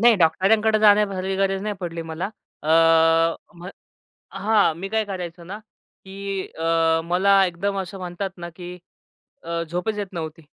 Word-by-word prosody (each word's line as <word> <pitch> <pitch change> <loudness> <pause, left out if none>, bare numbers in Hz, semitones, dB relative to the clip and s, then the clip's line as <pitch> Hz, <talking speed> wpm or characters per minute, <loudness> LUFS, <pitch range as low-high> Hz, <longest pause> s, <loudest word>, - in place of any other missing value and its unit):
नाही 235 0 +6
डॉक्टरांकडे 210 +6 +3
जाण्यासारखी 200 -3 +3
गरज 195 0 0
नाही 210 0 -2
पडली 170 -2 -4
मला. 165 +4 -3 0.4
अ, 150 - -5 0.9
म्ह 180 - -8 0.6
हां, 200 -3 +2
मी 190 +3 -5
काय 220 0 0
करायचो 180 -3 -6
ना 190 +5 -7
की 195 -2 -8
अ, 165 0 +2
मला 195 +3 +3
एकदम 195 +3 -2
असं 190 +1 -8
म्हणतात 185 +1 -4
ना, 170 0 -7
की 175 +1 -9 0.7
अ, 170 0 -3
झोपच 180 +6 -2
येत 205 -1 -3
नव्हती. 165 -1 -6
190 Hz, 150 wpm, -23 LUFS, 170-200 Hz, 0.9 s, नाही